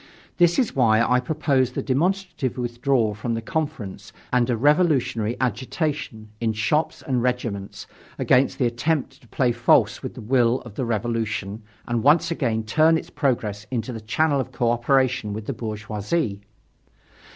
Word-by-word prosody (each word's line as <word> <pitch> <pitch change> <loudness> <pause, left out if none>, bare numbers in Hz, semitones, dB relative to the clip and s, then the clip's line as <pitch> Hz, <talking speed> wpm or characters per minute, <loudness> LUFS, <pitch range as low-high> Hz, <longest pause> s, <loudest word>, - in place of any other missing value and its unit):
This 175 -1 +4
is 250 - +1
why 115 -4 +4
I 125 +2 +3
proposed 130 -2 0
the - - -2
demonstrative 170 - -1
withdrawal 120 -2 0
from 115 +3 -3
the - - -2
Conference 145 -8 -4 0.2
and 125 0 +3
a 120 - +1
revolutionary 135 -6 +2
agitation, 130 - -2
in 115 -1 +1
shops 150 +9 0
and 130 -5 0
regiments, 120 -5 -3 0.3
against 130 +2 +2
the 130 - +1
attempt 135 +3 -1
to 120 - -20
play 125 +1 +1
false 120 0 +3
with - - -6
the - - -8
will 120 +1 +2
of 120 -4 -11
the 125 - -3
Revolution 110 -2 -2 0.3
and 120 -1 0
once 150 +6 +4
again 115 -9 -1
turn 155 +9 +3
its - - -8
progress 110 -8 -1
into 125 0 -3
the 115 - -6
channel 140 +7 +1
of 130 - -7
cooperation 120 -2 +1
with 105 0 -6
the 140 - -3
bourgeoisie. 110 +2 -3
125 Hz, 155 wpm, -23 LUFS, 110-140 Hz, 0.3 s, This